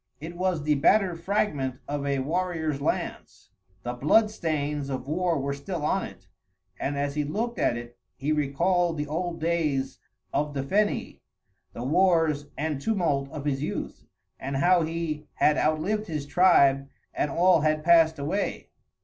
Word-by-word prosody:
It 165 +3 -7
was 180 -3 -1
the 150 0 +2
battered 175 +4 +3
fragment 155 -9 -1
of 145 0 -3
a 140 -1 +1
warrior's 160 0 -1
lance. - - -4 0.3
The 120 - -3
blood 210 - +3
stains 150 -6 -2
of 135 0 -4
war 170 +2 0
were 140 +1 -2
still 150 +3 -4
on 190 +5 +1
it, 95 0 -13 0.5
and 140 +1 -2
as 140 0 -1
he 150 0 0
looked 230 +11 -3
at 120 - +2
it 120 0 -10 0.2
he 145 +3 -2
recalled 165 +4 +1
the 150 - -2
old 165 +3 -3
days 155 -5 -1 0.3
of 145 0 -1
the 135 - -1
Feni, 205 +9 0 0.5
the 120 - -6
wars 160 -1 +2
and 150 -2 -2
tumult 160 -10 0
of 145 0 -7
his 135 -2 -1
youth; 150 - -5 0.3
and 135 +1 -3
how 175 +5 +4
he 160 -2 -3
had 150 - +3
outlived 190 +10 0
his 150 -4 -3
tribe 140 -4 +4 0.2
and 150 - -1
all 175 +2 +4
had 155 0 +1
passed 165 -1 +5
away. 155 +8 -3
155 Hz, 160 wpm, -26 LUFS, 140-175 Hz, 0.5 s, passed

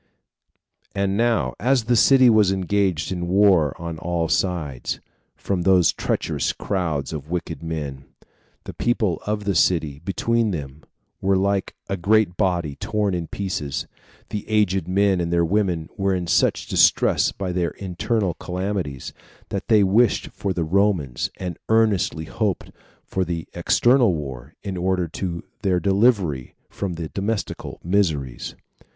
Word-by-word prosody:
5. - - -41
And 100 0 0
now, 115 - +1
as 125 +3 +2
the 120 +2 +2
city 130 +2 +6
was 110 -4 +5
engaged 95 -3 0
in 90 -2 -3
a - - -2
war 90 -5 +3
on 85 -1 -5
all 85 -1 -1
sides, 80 -9 -1 0.4
from 95 -3 -2
these 90 -2 +4
treacherous - - -1
crowds 80 -8 -2
of 75 -1 -6
wicked 85 -2 -4
men, 75 -5 -5 0.6
the - - -8
people 110 -7 0
of 105 0 -1
the 100 -1 0
city, 80 -4 +1
between 115 +4 0
them, 75 -5 -5 0.4
were 95 0 +2
like 100 0 0
a 100 - -2
great 100 0 +2
body 85 -7 0
torn 105 -2 -1
in 85 -2 -3
pieces. 75 -8 -3 0.4
The 105 - -4
aged 95 -5 +1
men 95 0 +2
and 85 0 -2
the 85 -1 +3
women 90 -3 0
were 95 -1 +1
in 90 -1 -2
such 85 - +2
distress - - +3
by 95 -2 -4
their 90 -1 0
internal 95 +1 -2
calamities, 90 -6 -4 0.4
that 100 0 -4
they 110 -3 +5
wished 105 +4 +3
for 100 - -3
the 90 -2 -1
Romans, 90 -6 +1
and 90 -2 -5
earnestly 100 -8 +2
hoped 105 -1 -2 0.3
for 95 - -2
an 85 -2 -2
external 120 +4 +3
war, 70 -1 -7
in 100 -2 -4
order 90 0 0
to 85 0 -4 0.2
their 95 -3 +2
delivery 95 - +1
from 95 -3 -4
their 85 -2 -5
domestical 100 +2 -3
miseries. 80 -9 -1
95 Hz, 150 wpm, -23 LUFS, 80-100 Hz, 0.6 s, city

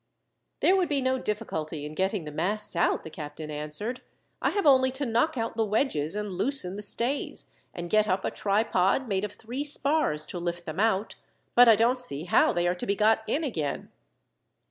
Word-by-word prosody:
"There 375 - +4
would 370 -2 +1
be 285 -2 +1
no 260 0 0
difficulty 160 -10 -4
in 150 - -7
getting 190 0 -1
the 150 - -7
masts 195 +7 -2
out," 170 - +1
the 160 - -9
captain 150 0 -8
answered. 150 +12 -3 0.4
"I - - +2
have 405 -3 -2
only 260 -2 +5
to 280 +2 -2
knock 245 +6 0
out 225 -1 -3
the 225 - +1
wedges, 205 - 0
and 210 -1 -4
loosen 195 0 +6
the 205 - -6
stays, 235 +7 -2 0.2
and 175 -1 -6
get 215 +3 +2
up 190 -1 -1
a - - -1
tripod 205 +3 +1
made 195 -2 -1
of 210 -1 -4
three 245 +6 -6
spars 285 - 0
to 175 - -6
lift 175 0 -4
them 160 +2 -6
out; 220 -1 0 0.4
but 245 0 +7
I 225 - +8
don't 245 +3 +2
see 155 - -3
how 175 - +3
they 175 0 0
are 175 - +2
to 180 - -7
be 200 - +1
got 220 +2 +3
in 290 +9 -1
again." 160 - -4
210 Hz, 205 wpm, -27 LUFS, 175-250 Hz, 0.4 s, I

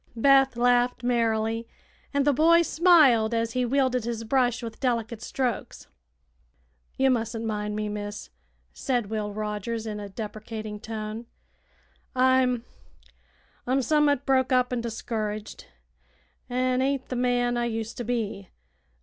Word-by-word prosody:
Beth 270 +1 +4
laughed 245 0 +2
merrily, 230 -1 0 0.4
and 280 -1 +1
the 290 - +4
boy 335 +4 +5
smiled 295 -11 +4
as 230 0 0
he 250 +2 0
wielded 255 -1 +1
his 230 -1 -3
brush 245 0 +1
with 225 -1 -7
delicate 230 -3 -1
strokes. 250 -2 -3 1.1
"Ye 270 - +3
mustn't 230 -2 0
mind 210 -1 -2
me, 215 0 -2
miss," 205 0 -6 0.4
said 245 -6 -2
Will 210 -1 -2
Rogers, 215 +2 -4
in 210 -1 -4
a 205 -1 -7
deprecating 215 0 -6
tone. 220 +1 -6 0.9
"I'm 255 -2 +3 1.0
I'm 265 +1 +2
sommut 290 0 +2
broke 260 -1 +2
up 250 0 +2
an' 240 - -1
discouraged, 215 -2 -5 0.8
an' 255 +1 +1
ain't 270 0 -1
th' 255 - -3
man 245 0 +1
I 240 0 0
used 225 -1 -4
to 245 - -3
be. 215 -5 -3
235 Hz, 130 wpm, -26 LUFS, 220-255 Hz, 1.1 s, boy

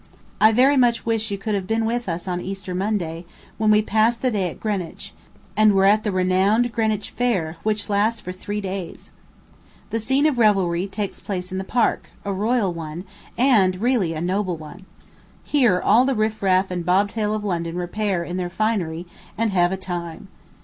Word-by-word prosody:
I 220 - +6
very 265 +5 +4
much 240 -2 +2
wish 225 -1 -1
you 200 - -3
could 210 +2 -3
have 195 -2 -2
been 225 +1 0
with 235 -1 -2
us 170 +3 -4
on 180 -1 -2
Easter 195 0 -5
Monday, 180 -4 -2 0.4
when 215 -1 +2
we 215 0 +5
passed 225 +3 +1
the 255 - +2
day 195 -5 0
at - - -11
Greenwich, 200 -6 -4 0.4
and 215 -1 +5
were 195 0 +4
at 210 +2 +5
the 210 - -2
renowned 190 +6 +2
Greenwich 220 -3 -1
Fair, 185 -10 -1
which 215 -1 -1
lasts 215 +2 +1
for 180 -4 -6
three 205 +3 -5
days. 190 -3 -6 0.8
The 225 - 0
scene 265 +6 +1
of 290 -6 +2
revelry 190 -4 +2
takes 200 0 -5
place 180 -2 -4
in 190 - -3
the - - -3
Park, 235 +4 0 0.2
a 200 - -1
royal 210 -1 +1
one, 165 +1 -6 0.3
and 210 -8 +3
really 220 -8 +1
a 155 - -4
noble 185 0 -1
one. 175 +5 -12 0.6
Here 245 -11 +3
all 220 +7 +4
the 270 0 +1
riff 215 0 -1
raff 190 -1 +2
and 175 -1 -3
bobtail 205 +4 +1
of 215 - -4
London 170 -4 -2
repair 180 +1 -1
in 175 +1 -5
their 180 -1 -2
finery, 180 -5 -1 0.3
and 225 -1 +1
have 175 -2 +2
a 190 - -2
time. 175 -1 -6
200 Hz, 190 wpm, -22 LUFS, 180-220 Hz, 0.8 s, I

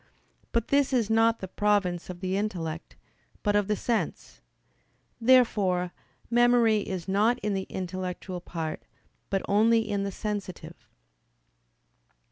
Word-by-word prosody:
But 230 -1 -1
this 280 -1 +2
is 230 -4 +1
not 225 +1 +3
the 190 - -4
province 190 -3 0
of 180 -1 -7
the 185 0 -1
intellect, 175 -6 -4 0.5
but 205 -1 +2
of 205 -1 +2
the 210 - +1
sense. 230 +2 -3 0.8
Therefore 210 -8 +3 0.4
memory 240 -2 +4
is 190 -4 -5
not 210 +5 +2
in 210 -1 -1
the 190 -1 -3
intellectual 185 0 -5
part, 165 -3 -5 0.5
but 195 -1 0
only 220 +2 +3
in 205 -2 -1
the 200 0 -2
sensitive. 205 -3 -6
205 Hz, 125 wpm, -27 LUFS, 185-225 Hz, 0.8 s, memory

